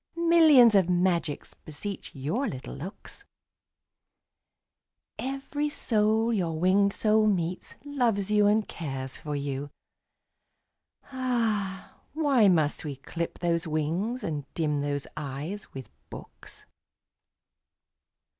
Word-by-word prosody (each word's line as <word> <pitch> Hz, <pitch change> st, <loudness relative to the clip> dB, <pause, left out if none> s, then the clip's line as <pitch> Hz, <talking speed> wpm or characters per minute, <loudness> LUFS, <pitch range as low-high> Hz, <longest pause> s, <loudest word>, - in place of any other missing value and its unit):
Millions 320 Hz, -8 st, +6 dB
of 190 Hz, -3 st, +4 dB
magics 175 Hz, -4 st, 0 dB
beseech 170 Hz, +6 st, -8 dB
your 155 Hz, -, -1 dB
little 130 Hz, -1 st, -6 dB
looks; 170 Hz, +9 st, -9 dB, 2.0 s
Every 275 Hz, +3 st, -3 dB
soul 220 Hz, -3 st, +1 dB
your 170 Hz, -6 st, -1 dB
winged 195 Hz, +3 st, +3 dB
soul 215 Hz, +1 st, +2 dB
meets, 180 Hz, -3 st, -2 dB
loves 230 Hz, -8 st, 0 dB
you 210 Hz, -1 st, +4 dB
and 210 Hz, +1 st, +2 dB
cares 135 Hz, -5 st, -6 dB
for 150 Hz, -1 st, -5 dB
you. 140 Hz, 0 st, -3 dB, 1.4 s
Ah! 225 Hz, -7 st, -2 dB
why 280 Hz, -8 st, +4 dB
must 160 Hz, -5 st, +2 dB
we 145 Hz, -3 st, -4 dB
clip 165 Hz, +5 st, -5 dB
those 170 Hz, -1 st, 0 dB
wings 165 Hz, +11 st, -1 dB
and 145 Hz, -3 st, -4 dB
dim 150 Hz, -3 st, 0 dB
those 145 Hz, -1 st, -2 dB
eyes 150 Hz, +7 st, -6 dB
with 130 Hz, -4 st, -8 dB, 0.2 s
books? -, -, -11 dB
190 Hz, 105 wpm, -27 LUFS, 150-225 Hz, 2.0 s, Millions